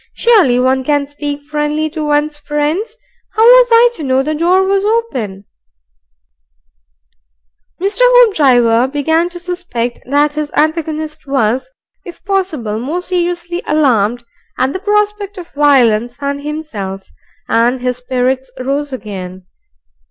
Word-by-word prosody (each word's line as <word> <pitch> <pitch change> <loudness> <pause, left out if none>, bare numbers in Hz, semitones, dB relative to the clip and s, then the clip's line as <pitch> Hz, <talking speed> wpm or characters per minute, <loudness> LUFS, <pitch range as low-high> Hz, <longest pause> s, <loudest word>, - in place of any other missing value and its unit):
"Surely 375 - +3
one 260 +1 +1
can 290 +1 +1
speak 290 0 -5
friendly 300 +1 -2
to 315 -1 -4
one's 295 0 0
friends. 295 +7 -2 0.4
How 440 - +2
was - - +7
I 470 +1 +6
to - - -7
know 265 -1 +1
the 305 +2 -2
door 350 +5 +2
was 390 +1 +1
open 260 - -2 1.5
" - - -52
Hoopdriver 360 - +4
began 320 +4 +1
to 350 - -9
suspect 350 -10 -4
that 290 +2 +2
his 300 0 -4
antagonist 310 -1 -1
was, 260 - 0 0.3
if 345 - -12
possible, 315 - -2
more 305 +9 -3
seriously 345 -1 -2
alarmed 245 -6 +1 0.3
at 260 +1 0
the 375 - -3
prospect 415 0 -1
of 350 -2 -9
violence 245 -5 +3
than 280 0 -3
himself, 240 -11 -6 0.4
and 240 +3 +2
his 250 0 -2
spirits 255 +1 -2
rose 275 +3 -2
again. 190 -7 -7
295 Hz, 130 wpm, -14 LUFS, 250-350 Hz, 1.5 s, was